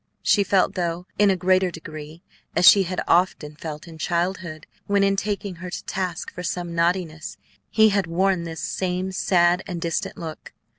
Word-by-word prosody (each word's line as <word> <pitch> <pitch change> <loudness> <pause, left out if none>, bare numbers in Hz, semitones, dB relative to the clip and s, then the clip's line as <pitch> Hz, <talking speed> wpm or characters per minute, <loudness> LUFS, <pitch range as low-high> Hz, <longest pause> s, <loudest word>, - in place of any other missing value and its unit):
She 205 - +4
felt, 195 -1 +2
though 175 0 -2
in 205 -1 +5
a 190 - +3
greater 185 0 +2
degree, 155 0 -9 0.3
as 180 - +5
she 200 - +9
had 185 - -2
often 170 -4 +2
felt 155 +1 -7
in 160 -1 -11
childhood, 170 -2 -2 0.2
when, 200 0 +3
in 195 0 +3
taking 200 -2 -3
her 180 +1 -7
to - - -6
task 180 -3 -3
for 180 - -6
some 175 -1 -3
naughtiness, 170 -2 -1 0.3
he 220 0 +5
had 200 -3 +1
worn 185 +1 +1
this 165 -1 -6
same 185 0 -2
sad 180 -1 +3
and 175 -2 -4
distant 165 -1 -2
look. 160 -2 -8
180 Hz, 180 wpm, -23 LUFS, 165-190 Hz, 0.3 s, she